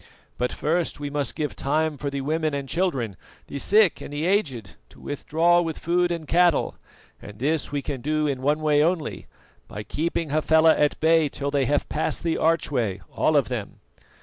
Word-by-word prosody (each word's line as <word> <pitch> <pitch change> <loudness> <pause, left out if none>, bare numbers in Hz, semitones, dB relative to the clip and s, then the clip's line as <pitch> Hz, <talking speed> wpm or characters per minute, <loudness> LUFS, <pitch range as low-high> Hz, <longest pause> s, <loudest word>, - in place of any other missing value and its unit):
But 125 0 0
first 165 +1 -1
we 145 -1 -5
must 145 -3 -2
give 150 -2 -3
time 155 +2 0
for 140 0 -4
the 140 0 -4
women 155 +1 -1
and 140 -1 -4
children, 135 - -1 0.3
the 140 - -6
sick 210 +3 +3
and - - -8
the 145 +2 -2
aged, 140 - 0 0.2
to - - -18
withdraw 165 +4 +1
with 165 -2 -3
food 175 +1 +1
and 165 -3 -4
cattle; 175 -1 +3 0.5
and 105 0 -11
this 145 +6 -1
we 145 -1 -2
can 135 -3 -4
do 155 +3 0
in 135 -3 -2
one 150 +3 +1
way 150 -1 +3
only, 165 -2 -2 0.4
by 105 - -7
keeping 165 +3 -2
Hafela 160 +1 +4
at 150 0 +1
bay 160 -1 +3
till 140 +1 -3
they 140 -2 +1
have 145 +3 0
passed 155 - -2
the 165 -1 0
archway, 130 - 0 0.2
all - - +3
of - - +2
them. - - -5
150 Hz, 190 wpm, -24 LUFS, 140-165 Hz, 0.5 s, Hafela